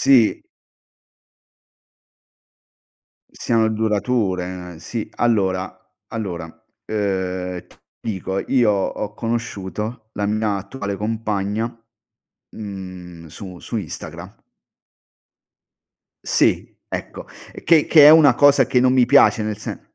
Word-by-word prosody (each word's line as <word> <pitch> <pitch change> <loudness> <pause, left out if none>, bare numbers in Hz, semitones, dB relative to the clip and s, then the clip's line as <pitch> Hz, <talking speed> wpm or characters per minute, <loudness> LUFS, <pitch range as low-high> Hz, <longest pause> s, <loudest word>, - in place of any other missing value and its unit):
Sì. 135 - +4 2.9
Siano 115 -2 +1
durature. 95 -6 -1
Sì, 110 +7 -5
allora 95 -5 +1 0.4
allora 90 -7 -5 0.4
ehm, 95 -3 -2
t - - -22 0.2
dico, 95 -2 -3
io 120 -5 +4
ho 100 +1 -2
conosciuto 110 0 -4
la 105 - -3
mia 105 -1 0
attuale 100 0 -5
compagna, 105 0 -2 0.8
mhmm, 90 -5 -9
su 90 +3 -10
su 115 - -6
Instagra 95 -8 -8 1.8
Sì, - - +1
ecco, - - -6 0.4
che 160 -3 +5
che 150 -3 +8
è - - +11
una 155 -5 +7
cosa 140 -1 +5
che 125 - +2
non 130 0 +4
mi 125 -2 +4
piace 135 -4 +5
nel 105 -1 -3
sen 105 - -7
105 Hz, 100 wpm, -21 LUFS, 95-115 Hz, 2.9 s, è